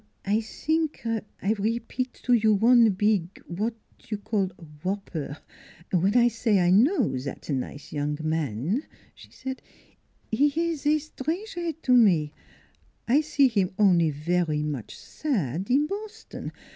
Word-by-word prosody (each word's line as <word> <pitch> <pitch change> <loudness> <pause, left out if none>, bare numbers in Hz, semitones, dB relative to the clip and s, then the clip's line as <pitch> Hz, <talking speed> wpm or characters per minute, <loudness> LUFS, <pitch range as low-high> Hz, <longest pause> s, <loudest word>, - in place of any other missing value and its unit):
" - - -31
I 205 +2 +2
zink 315 +6 -2
I 220 -2 -2
repeat 235 +4 -2
to 250 - +3
you 220 -2 +4
one 230 +2 +6
beeg 200 -2 0
what 215 +7 -2 0.3
you 215 - -2
call 200 -2 -1 0.3
wh - - -3
opper, 175 -7 -3 0.5
when 190 +5 +3
I 240 0 +6
say 225 -3 +1
I 175 0 +3
know 220 - +4
zat 135 +1 -7
nize 140 +2 -4
young 145 0 -1
man," 155 - -1 0.3
she - - -16
said. 265 0 -6 0.4
" - - -40
He 275 +7 +4
ees 330 -3 -1
etranger 320 +4 -1
to 255 - +3
me; 170 -11 +4 0.7
I 270 +6 +4
see 290 -3 +3
him 195 -6 0
only 180 -6 +4
vary 155 +1 0
much 145 -7 -5
sad 190 - -2
in 275 +4 +4
Bos 420 +5 -6
ton. - - -7
210 Hz, 145 wpm, -26 LUFS, 170-260 Hz, 0.7 s, one